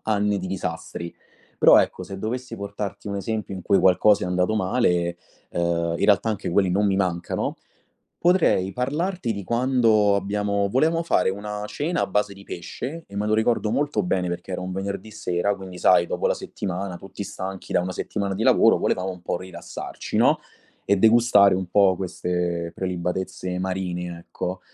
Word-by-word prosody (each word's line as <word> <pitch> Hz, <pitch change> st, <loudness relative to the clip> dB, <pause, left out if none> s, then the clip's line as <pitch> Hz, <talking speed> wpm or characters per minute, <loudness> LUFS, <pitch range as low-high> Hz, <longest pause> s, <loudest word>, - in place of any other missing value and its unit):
anni 105 Hz, -1 st, +1 dB
di 95 Hz, -, -5 dB
disastri. 85 Hz, -2 st, -5 dB, 0.5 s
Però, -, -, +8 dB
ecco, -, -, 0 dB
se 95 Hz, -, -8 dB
dovessi 120 Hz, +3 st, -4 dB
portarti 100 Hz, 0 st, -6 dB
un 100 Hz, -1 st, -3 dB
esempio 105 Hz, +1 st, -3 dB
in 95 Hz, -, -6 dB
cui 100 Hz, -, +3 dB
qualcosa 95 Hz, +2 st, +4 dB
è -, -, -2 dB
andato 90 Hz, +3 st, +1 dB
male, 90 Hz, -5 st, +1 dB, 0.3 s
ehm, 85 Hz, -1 st, 0 dB
in -, -, +1 dB
realtà 105 Hz, +2 st, +4 dB
anche 105 Hz, -, -3 dB
quelli 95 Hz, +1 st, +3 dB
non 100 Hz, +3 st, +2 dB
mi 95 Hz, -1 st, +2 dB
mancano, 90 Hz, -3 st, -1 dB, 0.6 s
potrei 170 Hz, -, +3 dB
parlarti 150 Hz, +3 st, -1 dB
di 100 Hz, -3 st, -5 dB
quando 115 Hz, -3 st, +3 dB
abbiamo 100 Hz, 0 st, 0 dB
volevamo 160 Hz, +8 st, +2 dB
fare 95 Hz, -, +2 dB
una 105 Hz, +2 st, -5 dB
cena 160 Hz, +9 st, -2 dB
a -, -, +2 dB
base 105 Hz, +1 st, 0 dB
di 100 Hz, -, -14 dB
pesce, 130 Hz, -, -6 dB
e 100 Hz, -, -12 dB
me 105 Hz, +1 st, -1 dB
lo 110 Hz, -, +2 dB
ricordo 110 Hz, -1 st, +1 dB
molto 145 Hz, +3 st, 0 dB
bene 95 Hz, -, 0 dB
perché 90 Hz, +2 st, -5 dB
era -, -, -2 dB
un 90 Hz, 0 st, -5 dB
venerdì 100 Hz, +2 st, -4 dB
sera 100 Hz, -2 st, -1 dB
quindi, 95 Hz, -2 st, -9 dB
sai, 90 Hz, -1 st, +5 dB
dopo -, -, -1 dB
la -, -, +2 dB
settimana, 95 Hz, -1 st, -5 dB
tutti 100 Hz, +2 st, -8 dB
stanchi 95 Hz, -1 st, -7 dB
da -, -, +3 dB
una 90 Hz, +1 st, -3 dB
settimana 100 Hz, +2 st, -3 dB
di 100 Hz, +4 st, -2 dB
lavoro, -, -, +5 dB
volevamo 95 Hz, +1 st, 0 dB
un 90 Hz, -1 st, -11 dB
po' 90 Hz, -, -2 dB
rilassarci, 95 Hz, +1 st, -6 dB
no, -, -, +4 dB, 0.4 s
e 100 Hz, -, +2 dB
degustare 110 Hz, -2 st, +5 dB
un 95 Hz, -1 st, -3 dB
po' 95 Hz, -1 st, +4 dB
queste 90 Hz, -2 st, -2 dB
prelibatezze 90 Hz, 0 st, -3 dB
marine, 90 Hz, -2 st, -3 dB
ecco. 90 Hz, +2 st, -5 dB
100 Hz, 175 wpm, -24 LUFS, 90-105 Hz, 0.6 s, Però